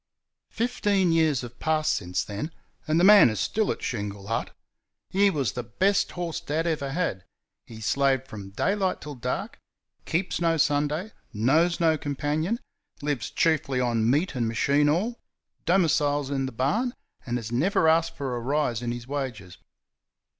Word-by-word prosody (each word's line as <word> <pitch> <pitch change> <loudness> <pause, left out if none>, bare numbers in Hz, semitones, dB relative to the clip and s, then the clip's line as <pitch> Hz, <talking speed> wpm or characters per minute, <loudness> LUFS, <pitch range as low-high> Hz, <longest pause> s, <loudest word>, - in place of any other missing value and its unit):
Fifteen 205 -6 +1
years 160 -5 +3
have 120 -2 -10
passed 155 -1 +1
since 90 +1 -2
then, 105 +9 -5 0.4
and 155 +2 +2
the - - +3
man 200 - +8
is 110 -3 -3
still 215 - 0
at - - -6
Shingle 100 -4 -4
Hut. 115 +3 -2 0.6
He 200 +1 +4
was 140 - 0
the 125 - -4
best 185 - +1
horse 170 -2 -3
Dad 160 0 -2
ever 145 -5 -1
had. 160 - -1 0.4
He 110 -1 -10
slaved 135 +2 +1
from 100 -5 -8
daylight 190 - 0
till 150 0 -7
dark; 125 -1 -4 0.5
keeps 175 +1 -1
no 165 -1 +2
Sunday; 150 +6 +1 0.2
knows 155 +11 +2
no 160 -2 +3
companion; 150 - -1 0.5
lives 145 -5 -2
chiefly 145 -5 +1
on 115 -2 +1
meat 150 +8 +1
and 120 -4 -1
machine 140 +6 +2
oil; 210 +10 0 0.5
domiciles 145 -5 +2
in 135 -1 -1
the - - -5
barn; 150 - 0 0.3
and 120 -1 -2
has 115 -2 -6
never 160 +7 +2
asked 165 +1 +3
for 135 -3 -3
a - - -2
rise 125 -2 0
in 120 -1 -2
his 120 0 -6
wages. 125 -10 -5
145 Hz, 160 wpm, -26 LUFS, 120-165 Hz, 0.6 s, man